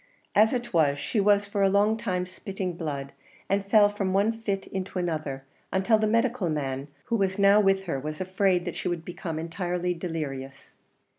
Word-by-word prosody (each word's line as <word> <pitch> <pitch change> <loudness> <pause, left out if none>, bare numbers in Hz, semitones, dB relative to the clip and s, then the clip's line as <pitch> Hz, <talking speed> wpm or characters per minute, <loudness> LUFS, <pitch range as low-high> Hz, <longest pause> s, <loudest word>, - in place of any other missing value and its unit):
As 215 +2 +5
it 240 -4 -3
was, 145 -4 +3
she 175 +9 -1
was 205 0 +4
for 200 0 -2
a 195 - +5
long 205 +3 +3
time 180 -4 -2
spitting 185 0 -5
blood, 145 -5 -5 0.3
and 195 +1 +1
fell 205 +1 +5
from 200 -2 -2
one 205 +4 +3
fit 195 -3 -2
into 190 0 -5
another, 155 -6 -2 0.3
until 195 +4 +3
the 215 - +2
medical 230 -3 +1
man 135 -2 -2 0.2
who 235 - 0
was 195 -3 0
now 200 +1 +6
with 195 -1 +3
her 165 -7 -2
was 155 +3 -5
afraid 185 -1 +1
that - - -4
she - - -3
would 170 -2 -2
become 170 -2 -5
entirely 175 +2 -2
delirious. 145 -6 -6
185 Hz, 190 wpm, -27 LUFS, 165-200 Hz, 0.3 s, now